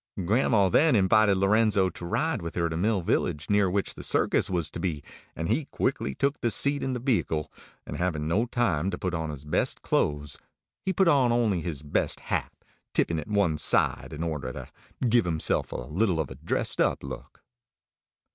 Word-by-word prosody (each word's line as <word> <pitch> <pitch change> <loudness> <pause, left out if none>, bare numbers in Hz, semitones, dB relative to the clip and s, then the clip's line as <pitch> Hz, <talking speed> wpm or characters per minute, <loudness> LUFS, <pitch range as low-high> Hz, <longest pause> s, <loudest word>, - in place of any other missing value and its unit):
Grandma 105 -1 +3
then 150 - +4
invited 100 0 +4
Lorenzo 100 0 +3
to 85 - -9
ride 150 - -1
with 85 0 -6
her 85 -1 0
to 80 - -4
Mill 100 +2 0
Village, 75 +1 -1
near 100 -2 +3
which 100 +2 -1
the - - -10
circus - - +1
was 85 -4 0
to - - -7
be; 80 -6 -3 0.3
and 80 - -3
he 150 - 0
quickly 70 - -2
took 140 0 -1
a 120 - +2
seat 140 +5 +2
in 130 - -2
the 125 - -3
vehicle, 110 - -1 0.3
and - - -6
having 80 -4 -2
no 105 +9 +1
time 95 -9 0
to - - -4
put 90 -2 -3
on 80 -2 -2
his 75 -1 -7
best 75 - 0
clothes, 75 -1 -1 0.4
he 190 - 0
put 190 0 +2
on 135 -7 +4
only 110 -7 +1
his 75 -4 -5
best 75 - -1
hat, - - -1 0.4
tipping 80 -1 +1
it 75 - -7
one 100 -7 +1
side - - +3
in 75 - -5
order 75 -6 -3
to - - -8 0.4
give 120 -2 +3
himself 80 -2 +2
a - - -6
little 80 - -1
of 80 - -2
a - - -7
dressed - - -1
up - - +1
look. 65 -2 -9
95 Hz, 195 wpm, -27 LUFS, 80-115 Hz, 0.4 s, then